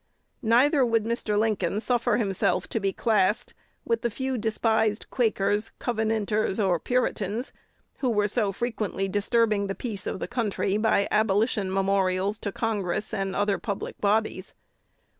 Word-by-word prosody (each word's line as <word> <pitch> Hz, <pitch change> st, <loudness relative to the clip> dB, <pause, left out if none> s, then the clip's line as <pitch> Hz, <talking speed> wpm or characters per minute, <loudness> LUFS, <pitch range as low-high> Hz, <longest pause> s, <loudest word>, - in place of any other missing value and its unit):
Neither 260 Hz, +5 st, +4 dB
would 230 Hz, -2 st, +2 dB
Mr. 225 Hz, -2 st, -1 dB
Lincoln 210 Hz, -3 st, +1 dB
suffer 235 Hz, -2 st, +1 dB
himself 195 Hz, -5 st, 0 dB
to 225 Hz, -, -1 dB
be 195 Hz, -1 st, 0 dB
classed 210 Hz, -2 st, +1 dB, 0.3 s
with 230 Hz, -1 st, 0 dB
the 235 Hz, -, 0 dB
few 260 Hz, +3 st, -3 dB
despised 220 Hz, -1 st, +1 dB
Quakers, 215 Hz, -2 st, 0 dB
Covenanters, 220 Hz, -3 st, 0 dB
and 185 Hz, -6 st, +1 dB
Puritans, 240 Hz, -2 st, -1 dB, 0.5 s
who 260 Hz, -, +1 dB
were 210 Hz, -3 st, +2 dB
so 210 Hz, -1 st, +1 dB
frequently 210 Hz, -3 st, -2 dB
disturbing 210 Hz, +1 st, +1 dB
the 195 Hz, -, -3 dB
peace 215 Hz, -6 st, -5 dB
of -, -, -2 dB
the -, -, -4 dB
country 210 Hz, -5 st, -1 dB
by 215 Hz, -2 st, +2 dB
abolition 210 Hz, -1 st, +1 dB
memorials 195 Hz, +1 st, +1 dB
to 200 Hz, -, -3 dB
Congress 210 Hz, -2 st, -2 dB
and 195 Hz, -1 st, -2 dB
other 205 Hz, -1 st, +1 dB
public 200 Hz, -4 st, -5 dB
bodies. 205 Hz, -2 st, 0 dB
215 Hz, 140 wpm, -26 LUFS, 200-230 Hz, 0.5 s, Neither